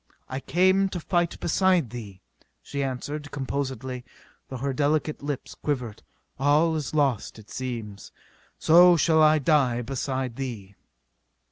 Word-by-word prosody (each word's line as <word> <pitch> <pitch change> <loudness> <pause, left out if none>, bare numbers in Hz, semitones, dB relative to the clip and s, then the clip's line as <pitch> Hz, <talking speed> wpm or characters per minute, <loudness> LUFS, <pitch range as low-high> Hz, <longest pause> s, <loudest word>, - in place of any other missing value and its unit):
"I 130 - -4
came 185 +5 +2
to 180 - -4
fight 175 0 -1
beside 175 - +2
thee," 105 -6 -9 0.4
she 140 - -4
answered 145 +3 -4
composedly, 130 -2 -4 0.5
though 130 - -5
her 135 +2 -2
delicate 150 +2 0
lips 145 -2 -5
quivered. 125 -7 -4 0.4
"All 150 +4 +3
is 155 0 -4
lost, 135 -9 0
it 110 -1 -15
seems. 115 -6 -6 0.5
So 175 +2 +6
shall 160 +1 +3
I 155 0 +6
die 135 -5 +2
beside 130 -1 -3
thee." 115 -8 -6
140 Hz, 130 wpm, -26 LUFS, 125-155 Hz, 0.5 s, So